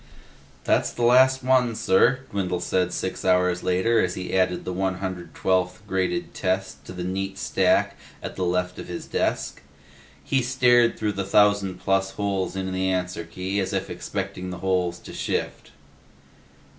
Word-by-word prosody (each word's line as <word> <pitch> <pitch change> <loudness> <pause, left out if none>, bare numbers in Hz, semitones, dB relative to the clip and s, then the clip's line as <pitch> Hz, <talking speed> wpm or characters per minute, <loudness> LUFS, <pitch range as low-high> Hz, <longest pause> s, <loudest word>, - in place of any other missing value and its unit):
"That's - - +2
the 120 - -4
last 130 +2 +5
one, 125 -3 +3
sir," 110 +7 +3
Dwindle 90 -3 -1
said 90 0 0
six 95 +1 -3
hours 90 -1 +2
later 110 +6 +2
as 90 -1 -1
he 90 - -5
added 90 -1 +1
the 90 - -3
one 95 0 -1
hundred 90 -3 -6
twelfth 90 +2 0
graded 100 - -1
test 95 +1 -2
to - - -9
the 90 -1 -5
neat 95 +1 -3
stack - - +2 0.3
at - - -6
the 95 - -2
left 90 0 -1
of - - -7
his 90 - -6
desk. - - -2 0.6
He 130 - +1
stared 120 -2 +3
through 105 -1 -1
the 100 0 -2
thousand 100 -1 +3
plus 95 0 +1
holes 95 -3 -2
in 95 0 -3
the 95 0 -1
answer 90 -2 -2
key 95 +4 -3
as 95 - -2
if - - -2
expecting 90 0 -5
the 90 - -5
holes 90 -2 +1
to - - -11
shift. - - -3
95 Hz, 170 wpm, -24 LUFS, 90-105 Hz, 0.6 s, last